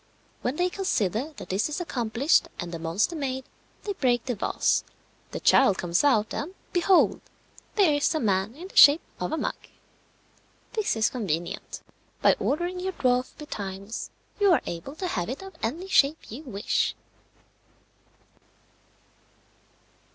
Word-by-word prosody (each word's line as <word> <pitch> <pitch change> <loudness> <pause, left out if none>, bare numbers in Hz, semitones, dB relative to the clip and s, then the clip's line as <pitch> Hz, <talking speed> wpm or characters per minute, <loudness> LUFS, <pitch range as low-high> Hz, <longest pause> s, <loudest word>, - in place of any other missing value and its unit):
When 250 - -1
they 360 +2 +1
consider 265 - -1
that 190 -10 -10
this 200 +8 0
is 300 - -3
accomplished, 275 +1 +1
and 175 -1 -4
the 165 - -5
monster 170 - 0
made, 265 -3 -3 0.4
they 410 - -2
break 245 -8 +1
the 250 - -1
vase. 210 - +1 0.5
The - - -5
child 230 -8 +5
comes 175 +4 +1
out 220 -7 +3
and, 360 +6 -4 0.2
behold, 360 +1 +4 0.5
there 385 -8 +4
is 290 +2 +1
a - - +1
man 200 0 0
in 350 +5 -9
the - - -18
shape 290 +3 +8 0.2
of 180 - -2
a - - -1
mug! - - -1 1.2
This 435 - 0
is 220 -1 +2
convenient: 180 -5 -3 0.4
by - - +5
ordering 350 +5 -1
your 375 +1 -3
dwarf 250 -4 0
betimes 200 -7 -6 0.3
you 405 -2 +5
are 340 - +4
able 175 - -6
to 370 - -4
have 180 - -2
it 270 +9 -5
of 385 0 -10
any 325 +12 -3
shape 300 - +2
you 245 +7 -7
wish. 205 -6 -1
265 Hz, 150 wpm, -26 LUFS, 205-340 Hz, 1.2 s, shape